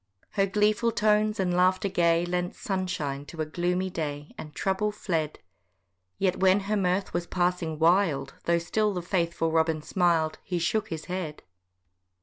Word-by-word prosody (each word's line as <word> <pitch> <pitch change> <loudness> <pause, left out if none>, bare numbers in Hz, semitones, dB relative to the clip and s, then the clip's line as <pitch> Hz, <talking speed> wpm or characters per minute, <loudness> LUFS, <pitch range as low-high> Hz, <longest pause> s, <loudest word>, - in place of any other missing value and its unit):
Her 195 -1 +2
gleeful 210 +3 +2
tones 215 0 +2
and 180 -2 +1
laughter 185 +2 +3
gay 170 -2 +2
Lent 180 0 -2
sunshine 180 - -3
to 165 - -10
a 155 - 0
gloomy 180 +4 -1
day, 145 -3 -4
And 150 - -8
trouble 195 +2 0
fled: 165 -7 -2 0.8
Yet 185 -2 0
when 190 +1 +4
her 205 +2 -1
mirth 190 -1 0
was 175 0 -2
passing 175 -3 0
wild, 160 -5 +2
Though 170 0 +3
still 210 +4 0
the 180 - -3
faithful 170 -3 0
Robin 160 -1 +1
smil'd, 165 -3 +1
He 180 -3 -2
shook 210 +6 0
his 160 -6 -5
head. 180 -5 -5
180 Hz, 155 wpm, -27 LUFS, 165-195 Hz, 0.8 s, when